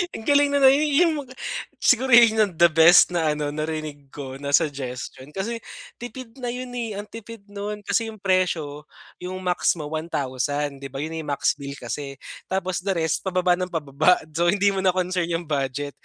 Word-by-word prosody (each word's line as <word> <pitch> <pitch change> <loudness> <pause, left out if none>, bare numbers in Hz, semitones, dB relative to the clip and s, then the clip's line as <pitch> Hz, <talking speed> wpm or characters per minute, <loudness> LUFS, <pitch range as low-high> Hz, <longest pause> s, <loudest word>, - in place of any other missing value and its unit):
ang 220 - -7
galing 285 +1 +4
nun, 280 - +2
ah. 265 - +9
'Yung 295 0 +2 0.5
siguro 255 +1 +3
'yun 225 -2 +6
ang 205 -4 +3
the 170 0 +5
best 165 +3 +7
na 160 -3 +1
ano, 150 -1 -2
narinig 155 -2 -5
ko 135 -1 -8
na 140 0 +2
suggestion 135 -3 -3
kasi 230 +4 -3 0.4
tipid 245 0 -8
na 245 - -4
'yun, 250 +1 -5
eh. 230 -4 -3
Ang 205 +1 -6
tipid 230 -1 -10
nun 205 +1 -5
kasi 225 +2 0
'yung 220 -1 -9
presyo, 165 -6 0 0.3
'yung 180 +1 -6
max 180 0 +1
mo 150 -3 -7
1,000, 145 -2 -2
'di 140 - -6
ba, 135 +2 -5
'yon 160 - -5
na 160 - -4
yung 145 - -4
max - - +1
bill 140 0 -6
kasi. 140 -1 -6 0.3
Tapos 185 -1 -2
the 190 +1 -2
rest 160 -2 0
pababa 180 -1 +2
nang 185 0 -3
pababa, 155 +2 +3 0.2
so 170 +3 +1
hindi 200 +3 +3
mo 195 - -2
na 185 -1 +2
concern 180 -1 0
'yung 170 0 -2
budget. 140 -1 -2
175 Hz, 195 wpm, -24 LUFS, 145-210 Hz, 0.5 s, ah